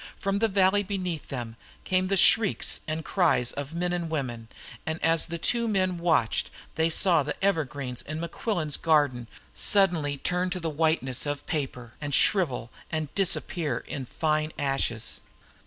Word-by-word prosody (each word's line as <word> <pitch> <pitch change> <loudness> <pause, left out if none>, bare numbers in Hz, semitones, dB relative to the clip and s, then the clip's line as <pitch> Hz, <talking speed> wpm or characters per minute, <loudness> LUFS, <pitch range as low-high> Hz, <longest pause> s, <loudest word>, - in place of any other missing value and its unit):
From 195 0 -1
the 225 - +3
valley 195 0 +3
beneath 185 -5 -4
them 120 -4 -6 0.3
came 185 0 +1
the 195 +1 +1
shrieks 210 +1 +5
and 155 0 -3
cries 165 -10 +2
of 145 +3 -6
men 175 +1 -1
and 170 -2 -2
women, 125 -7 -4 0.4
and 160 0 -3
as 165 0 +2
the 170 0 -4
two 235 +7 +1
men 185 -4 0
watched 160 -10 +1 0.2
they 160 +1 +1
saw 165 0 +4
the 150 +1 -3
evergreens 145 -9 -1
in 155 +2 -6
Mequillen's 170 -2 -2
garden 145 -7 +1 0.3
suddenly 170 -8 +2
turn 180 +5 0
to 180 0 -2
the 165 -2 -3
whiteness 150 -4 0
of 145 0 -4
paper, 130 -6 -4
and 145 -2 -1
shrivel 135 - +2 0.2
and 155 -2 -3
disappear 180 -4 0
in 135 -3 -5
fine 155 +1 -1
ashes. 135 -5 -2
160 Hz, 155 wpm, -27 LUFS, 140-185 Hz, 0.4 s, shrieks